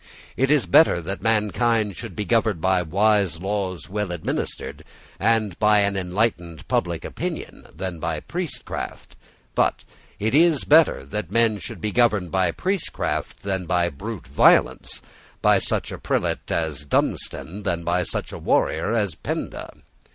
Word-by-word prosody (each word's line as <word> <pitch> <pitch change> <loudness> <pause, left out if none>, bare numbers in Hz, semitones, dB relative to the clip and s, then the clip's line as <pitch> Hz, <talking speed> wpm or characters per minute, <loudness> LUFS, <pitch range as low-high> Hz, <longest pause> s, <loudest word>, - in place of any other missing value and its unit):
It 135 +1 +1
is 150 -3 +3
better 160 - +5
that 95 +4 -5
mankind 110 -1 +1
should 110 -4 -8
be 105 - -3
governed 110 -2 +2
by 95 +2 +2
wise 100 -1 +2
laws 95 -2 -3
well 105 -1 -3
administered, 85 -3 -4 0.4
and 110 -5 +1
by 105 -1 +5
an 100 0 +1
enlightened 90 - -2
public - - -1
opinion, - - -5
than 90 -3 -5
by - - -2
priestcraft: - - -5 0.4
but - - +1 0.3
it 110 +3 -1
is 160 -1 +4
better 155 - +4
that 95 +5 -4
men 115 0 +2
should 115 -3 -7
be 105 - -1
governed 105 -6 +2
by 95 -1 +2
priestcraft 190 - -2
than 95 -3 -2
by 85 -1 +2
brute 100 +6 -7
violence, - - +3 0.4
by - - +4
such - - -1
a - - -6
prelate - - -1
as 80 -4 -1
Dunstan 95 +6 -1
than 85 -4 -2
by 90 +2 +1
such 85 - -3
a - - -7
warrior 85 +8 +1
as 105 -6 0
Penda. - - -5
100 Hz, 150 wpm, -23 LUFS, 90-110 Hz, 0.4 s, better